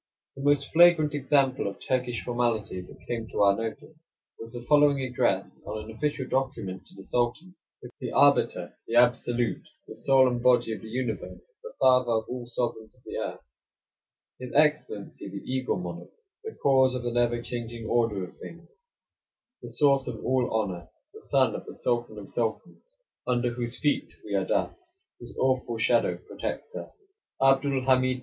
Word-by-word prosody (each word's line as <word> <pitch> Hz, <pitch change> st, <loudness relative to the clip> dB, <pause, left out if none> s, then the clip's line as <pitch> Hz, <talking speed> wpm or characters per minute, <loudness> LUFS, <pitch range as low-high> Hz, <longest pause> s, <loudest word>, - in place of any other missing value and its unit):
31 140 Hz, -, -7 dB
The 145 Hz, -, +4 dB
most 140 Hz, -1 st, +1 dB
flagrant 165 Hz, -3 st, +6 dB
example 135 Hz, -3 st, +2 dB
of 100 Hz, -1 st, -6 dB
Turkish 125 Hz, -2 st, -1 dB
formality 115 Hz, -6 st, -1 dB
that 90 Hz, -, -15 dB
came 115 Hz, -2 st, -3 dB
to 105 Hz, -, 0 dB
our 100 Hz, 0 st, +5 dB
notice 115 Hz, +9 st, -8 dB, 0.2 s
was 115 Hz, 0 st, -8 dB
the 120 Hz, 0 st, -7 dB
following 145 Hz, -1 st, +5 dB
address 130 Hz, -2 st, -1 dB
on 110 Hz, 0 st, -5 dB
an 110 Hz, +1 st, -10 dB
official 145 Hz, +1 st, -1 dB
document 115 Hz, -9 st, -2 dB
to -, -, -13 dB
the 95 Hz, -, -11 dB
Sultan: 125 Hz, -, -1 dB, 0.5 s
"The -, -, -4 dB
Arbiter; -, -, +3 dB
the 115 Hz, -, -2 dB
Absolute; 120 Hz, 0 st, +2 dB, 0.2 s
the -, -, -9 dB
Soul 135 Hz, -1 st, +4 dB
and 125 Hz, -1 st, -1 dB
Body 120 Hz, -2 st, +3 dB
of -, -, -7 dB
the 110 Hz, -, -10 dB
Universe; 125 Hz, -, -5 dB
the 480 Hz, 0 st, -10 dB
Father 125 Hz, -2 st, +4 dB
of 110 Hz, 0 st, +1 dB
all 125 Hz, -1 st, -5 dB
the -, -, -16 dB
sovereigns 115 Hz, -2 st, -3 dB
of 125 Hz, -, -28 dB
the -, -, -5 dB
earth; -, -, -5 dB, 0.9 s
His 125 Hz, -1 st, -7 dB
Excellency, 150 Hz, -10 st, +1 dB
the 100 Hz, +1 st, -7 dB
Eagle 130 Hz, 0 st, -1 dB
Monarch; 85 Hz, -1 st, -7 dB, 0.3 s
the 445 Hz, 0 st, -7 dB
Cause 130 Hz, -2 st, +4 dB
of 125 Hz, -, -4 dB
the 120 Hz, -, -1 dB
never 120 Hz, 0 st, +2 dB
changing 120 Hz, -1 st, -6 dB
order 115 Hz, -4 st, +1 dB
of 90 Hz, -, -10 dB
things; 170 Hz, 0 st, -11 dB, 0.9 s
the -, -, -8 dB
Source 140 Hz, -3 st, +3 dB
of 120 Hz, -3 st, -6 dB
all 130 Hz, -1 st, +1 dB
honor; 95 Hz, -7 st, -2 dB, 0.2 s
the -, -, -12 dB
Son -, -, +2 dB
of -, -, -7 dB
the -, -, -9 dB
Sultan 120 Hz, -3 st, -1 dB
of 100 Hz, -, -8 dB
Sultans, 120 Hz, +9 st, -3 dB, 0.5 s
under 120 Hz, -1 st, +1 dB
whose 120 Hz, 0 st, -3 dB
feet 145 Hz, -, 0 dB
we -, -, -5 dB
are -, -, +1 dB
dust, 370 Hz, -, -1 dB, 0.4 s
whose 120 Hz, 0 st, -12 dB
awful 130 Hz, -3 st, +1 dB
shadow 115 Hz, +1 st, +2 dB
protects 465 Hz, -, -6 dB
us; -, -, -6 dB, 0.5 s
Abdul 135 Hz, 0 st, +3 dB
Hamid 130 Hz, -1 st, +3 dB
II. -, -, -10 dB
125 Hz, 180 wpm, -27 LUFS, 115-135 Hz, 0.9 s, flagrant